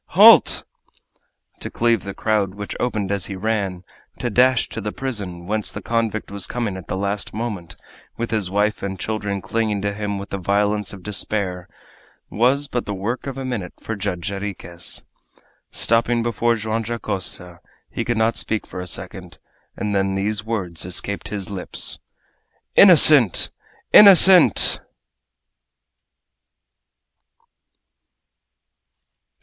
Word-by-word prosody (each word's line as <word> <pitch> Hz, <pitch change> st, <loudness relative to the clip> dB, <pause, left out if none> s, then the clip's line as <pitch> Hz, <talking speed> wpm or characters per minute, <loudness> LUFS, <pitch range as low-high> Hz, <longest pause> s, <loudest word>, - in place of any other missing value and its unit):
Halt!" -, -, +7 dB, 1.0 s
To -, -, -5 dB
cleave 115 Hz, -5 st, +1 dB
the 100 Hz, -, -6 dB
crowd, 105 Hz, -3 st, 0 dB
which 100 Hz, 0 st, -6 dB
opened 105 Hz, -5 st, -2 dB
as 100 Hz, -1 st, -1 dB
he 100 Hz, -, -6 dB
ran, 95 Hz, -3 st, -2 dB, 0.3 s
to 120 Hz, -, -3 dB
dash 125 Hz, +2 st, +3 dB
to -, -, -6 dB
the 105 Hz, -, -4 dB
prison, 100 Hz, -10 st, -5 dB
whence 105 Hz, +2 st, -2 dB
the -, -, -6 dB
convict 115 Hz, -3 st, -2 dB
was 100 Hz, -1 st, -2 dB
coming 115 Hz, -5 st, -3 dB
at 95 Hz, -, -9 dB
the -, -, -3 dB
last 100 Hz, +1 st, -3 dB
moment, 105 Hz, -8 st, -5 dB, 0.4 s
with 115 Hz, 0 st, -3 dB
his 105 Hz, -5 st, -1 dB
wife 105 Hz, +2 st, 0 dB
and 95 Hz, -1 st, -5 dB
children 105 Hz, -3 st, -3 dB
clinging 110 Hz, +1 st, -1 dB
to 100 Hz, 0 st, -1 dB
him 100 Hz, -1 st, -3 dB
with 100 Hz, +1 st, -8 dB
the 100 Hz, -, -3 dB
violence 100 Hz, +2 st, 0 dB
of 95 Hz, -3 st, -11 dB
despair, 95 Hz, -2 st, -3 dB, 0.6 s
was 130 Hz, +6 st, +2 dB
but 120 Hz, -3 st, -3 dB
the 100 Hz, -, -3 dB
work 115 Hz, +8 st, -4 dB
of 135 Hz, -1 st, -5 dB
a 135 Hz, -, -5 dB
minute 110 Hz, -9 st, -4 dB
for 110 Hz, -, -5 dB
Judge 100 Hz, -3 st, -4 dB
Jarriquez. 95 Hz, -4 st, -5 dB, 0.7 s
Stopping 115 Hz, +1 st, +1 dB
before 120 Hz, 0 st, +1 dB
Joam 110 Hz, +1 st, -2 dB
Dacosta, 95 Hz, -6 st, -4 dB, 0.3 s
he -, -, -4 dB
could 120 Hz, -1 st, -1 dB
not 110 Hz, +1 st, +2 dB
speak 110 Hz, -1 st, -1 dB
for -, -, -8 dB
a 90 Hz, -, -6 dB
second, 85 Hz, -, -7 dB, 0.4 s
and 105 Hz, +1 st, -2 dB
then 95 Hz, -1 st, 0 dB
these 105 Hz, +2 st, -1 dB
words 95 Hz, -7 st, -3 dB
escaped 90 Hz, +3 st, -1 dB
his 100 Hz, -2 st, -5 dB
lips: 95 Hz, -3 st, -1 dB, 0.8 s
"Innocent! 150 Hz, -, +6 dB, 0.4 s
Innocent!" 190 Hz, -2 st, +7 dB
105 Hz, 135 wpm, -21 LUFS, 95-115 Hz, 1.0 s, Halt